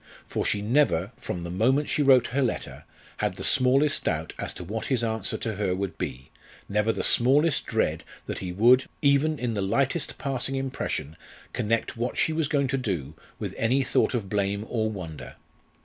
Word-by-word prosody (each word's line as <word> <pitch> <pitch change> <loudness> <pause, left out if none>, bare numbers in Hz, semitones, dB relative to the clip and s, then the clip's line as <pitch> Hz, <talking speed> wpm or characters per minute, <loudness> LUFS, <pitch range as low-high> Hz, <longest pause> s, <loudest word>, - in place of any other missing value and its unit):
For - - -2
she 100 -1 0
never, 110 - +2
from 90 - -5
the 85 - -5
moment 130 +10 +2
she - - 0
wrote 130 -4 +6
her 135 +4 0
letter, 125 - -3 0.3
had - - -1
the - - -7
smallest 135 +3 +3
doubt - - -1
as - - -2
to - - -7
what 110 +8 -4
his 130 -5 +1
answer 110 -3 -2
to 110 -4 -3
her 95 -3 0
would 95 -4 -4
be; 65 +2 -5 0.4
never 105 +2 +1
the - - -3
smallest 140 +6 +3
dread - - 0 0.2
that - - -4
he 90 -2 -4
would, 120 +7 +5 0.2
even 145 +2 +3
in 120 -3 -2
the 100 - -1
lightest 135 - 0
passing 135 -1 -3
impression, 130 - -3 0.4
connect 115 +2 -1
what 120 +2 -2
she 160 - +2
was 160 -2 0
going 140 -2 +1
to 135 0 0
do 85 - -3 0.2
with - - -5
any 130 +4 +2
thought 130 - +1
of 110 -5 -2
blame 100 +1 -1
or 110 -2 0
wonder. 85 -7 -7
115 Hz, 190 wpm, -26 LUFS, 100-135 Hz, 0.4 s, wrote